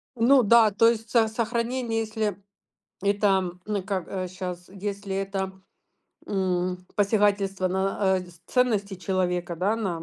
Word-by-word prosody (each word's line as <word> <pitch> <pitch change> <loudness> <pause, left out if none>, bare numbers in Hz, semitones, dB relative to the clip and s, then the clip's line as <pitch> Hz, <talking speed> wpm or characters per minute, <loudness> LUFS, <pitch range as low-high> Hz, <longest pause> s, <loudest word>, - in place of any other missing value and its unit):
Ну 250 +3 +5
да, 225 0 +6
то 230 +3 +4
есть, 225 -1 -2
со 230 -2 +4
сохранение, 230 +1 -1
если 215 -3 -2 0.6
это, 200 +1 +2
м, 185 -2 0
н 210 - -2
э, - - -2
как, 190 -2 -3
э, 185 -1 -3
щас, 180 -1 -6
если 200 0 -5
это, 195 -1 -2 0.8
м, 180 -2 -1
посягательство 200 -2 +2
на, 190 +1 -1 0.2
э, - - -4
дис 175 -2 -15
ценности 215 -6 +1
человека, 180 -2 -1
да, 200 +6 +1
на 185 -7 -3
195 Hz, 150 wpm, -26 LUFS, 185-220 Hz, 0.8 s, да